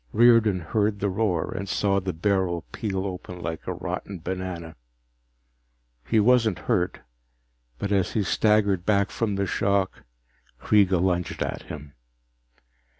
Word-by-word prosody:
Riordan 115 -5 +5
heard 105 +5 0
the 100 - 0
roar 90 -5 0
and 100 +1 -4
saw 100 -1 +1
the 95 -1 -3
barrel 90 -1 0
peel 95 -3 -3
open 90 -1 -6
like 80 -2 -5
a 90 - -1
rotten 90 +2 -5
banana. 90 -1 -5 1.3
He 110 - +3
wasn't 115 -4 +4
hurt, - - -1 0.8
but 100 - -3
as 95 -3 +1
he 105 - +1
staggered 100 -3 +2
back 100 0 +2
from 110 -4 -1
the 100 0 0
shock 100 0 0 0.6
Kreega 95 -4 +3
lunged 90 -1 0
at - - -4
him. 75 -1 -8
95 Hz, 135 wpm, -25 LUFS, 90-105 Hz, 1.3 s, Riordan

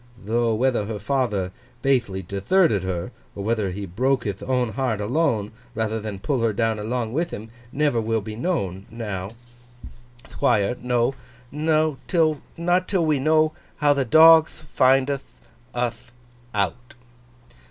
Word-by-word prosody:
Tho, 115 +1 +1
whether 120 -2 +1
her 110 -1 -4
father 105 -8 -1 0.3
bathely 120 -9 +1
detherted 100 - +2
her; 90 -2 -3 0.2
or 100 - -5
whether 110 -2 0
he 100 +2 -5
broke 125 +8 0
hith 100 -2 -4
own 125 -2 0
heart 110 -1 -1
alone, 110 -2 0 0.2
rather 110 0 -1
than 105 -2 -5
pull 130 +5 -1
her 115 -2 +1
down 115 0 0
along 115 +1 -2
with 165 +4 0
him; 110 +2 -8 0.2
never 145 -5 +1
will 110 0 0
be 105 +1 -7
known, 100 - -2
now, 105 -5 -5 1.0
Thquire, 105 -2 +1
till—no, 145 +6 0 0.2
not 175 +2 +1
till 185 -5 +1
we 150 -3 +2
know 155 +2 +3 0.3
how 145 -1 +4
the 140 -1 0
dogth 160 +4 +6
findth 135 +1 +3 0.5
uth 120 -1 -3 0.4
out! 105 +5 -2
120 Hz, 135 wpm, -23 LUFS, 105-140 Hz, 1.0 s, dogth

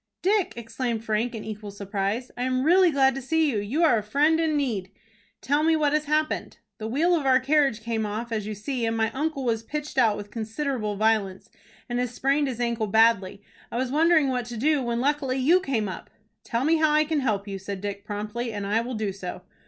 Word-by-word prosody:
"Dick!" 395 0 +2
exclaimed 230 0 -4
Frank, 225 +2 -1
in 220 - -6
equal 210 -1 -6
surprise. 200 +4 -3
"I 245 - -6
am 255 0 0
really 360 +4 +5
glad 270 -3 +3
to 270 - -5
see 315 +3 +1
you. 215 - -1
You 245 +12 -1
are 245 -9 +5
a - - -4
friend 290 +10 +2
in 315 -2 +1
need." 220 -10 -2 0.5
"Tell 290 +2 +1
me 320 +1 +3
what 300 -2 +1
has 305 0 +1
happened." 305 +1 -1 0.2
"The 215 - -4
wheel 310 +10 +2
of 295 -5 -1
our 260 -1 +5
carriage 275 -4 +2
came 225 -1 -1
off, 215 +3 -4
as 215 -2 -2
you 215 - -4
see 240 +4 -3
and 225 0 -1
my 220 0 +1
uncle 285 -1 -2
was 225 -2 0
pitched 300 +6 -4
out 215 -3 +3
with 205 0 -8
considerable 225 -1 -3
violence, 210 -3 0 0.4
and 245 -1 -2
has 250 -2 -1
sprained 280 +2 +1
his 250 -3 -4
ankle 235 -2 -1
badly. 205 -2 +3 0.3
I - - -3
was 255 0 -1
wondering 315 -1 +4
what 250 -2 -1
to 240 -1 -6
do, 295 +4 +2
when 235 -1 -1
luckily 275 -1 0
you 310 +8 +4
came 245 - -1
up." 185 - -7 0.3
"Tell 235 +1 -1
me 320 +3 +3
how 310 -1 +3
I 305 0 +5
can 310 -1 0
help 215 -6 -1
you," 195 -1 -5
said 195 0 -6
Dick, 200 0 -5
promptly, 210 +3 -4
"and 205 -2 -4
I 210 +3 +1
will 245 +1 -5
do 215 -2 -2
so." 185 -1 -7
240 Hz, 230 wpm, -25 LUFS, 215-290 Hz, 0.5 s, really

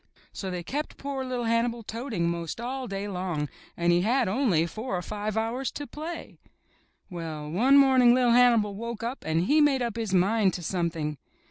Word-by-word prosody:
So 190 - -5
they 180 -1 -4
kept 290 - -4
poor 275 -1 -4
little 250 -2 -3
Hannibal 230 0 0
toting 225 -6 -3
'most 170 +2 -3
all 255 +2 -4
day 195 +1 -4
long, 180 -6 -3 0.3
and 170 0 +2
he 175 - +3
had 240 +5 +2
only 190 - +2
four 215 +4 -4
or - - -3
five 210 +2 -4
hours 235 +4 -1
to 290 - -5
play. 320 +4 -7 0.7
Well, 155 -3 -5
one 255 - +5
morning 260 -3 +6
LVV 250 -2 +3
Hannibal 235 -4 +4
woke 230 +2 -6
up 240 +4 -4
and 160 +1 +1
he 300 +10 +4
made 275 -4 +3
up 235 -2 -3
his 225 -4 -2
mind 195 +2 +3
to 175 - -6
something. 165 -4 -2
225 Hz, 190 wpm, -27 LUFS, 180-250 Hz, 0.7 s, morning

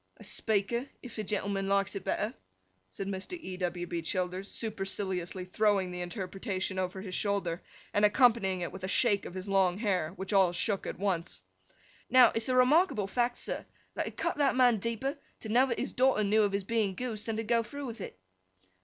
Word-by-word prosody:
'A - - -13
speaker, 220 +4 0 0.2
if 250 - -9
the 215 - -3
gentleman 200 -1 -1
likes 200 0 +1
it 195 - -4
better,' 210 +5 -1 0.6
said 195 - -5
Mr. 195 - -4
E. 185 - -6
W. 175 -1 -2
B. 170 -1 -3
Childers, 185 +3 -2
superciliously 195 -4 -3
throwing 195 -1 +1
the 180 0 -4
interpretation 190 0 -3
over 185 +1 -2
his 190 -2 -7
shoulder, 195 -5 0 0.3
and 205 - +2
accompanying 210 -5 +4
it 175 - -3
with 190 - -9
a - - -1
shake 205 0 +2
of 180 - -8
his 185 +1 -5
long 190 -2 +3
hair—which 190 -2 -1
all 190 -3 +5
shook 200 +2 0
at - - -4
once. 185 -4 -2 0.7
'Now, 255 -2 +7
it's 225 +2 0
a 255 - +2
remarkable 255 - +4
fact, 240 +4 0
sir, - - -4 0.3
that - - -2
it - - -8
cut - - -1
that 280 -3 +3
man 245 -4 +5
deeper, 230 +7 -2 0.2
to 220 - -6
know 250 +5 +4
that 235 - -2
his - - -2
daughter 255 -4 +3
knew 210 +2 +3
of 205 -1 +2
his 200 0 -1
being 210 -2 0
goosed, 225 -1 -3
than 225 -1 -1
to 225 - -1
go 230 +1 +2
through 280 +6 -7
with 230 -4 -7
it. - - -8
200 Hz, 200 wpm, -30 LUFS, 185-230 Hz, 0.7 s, Now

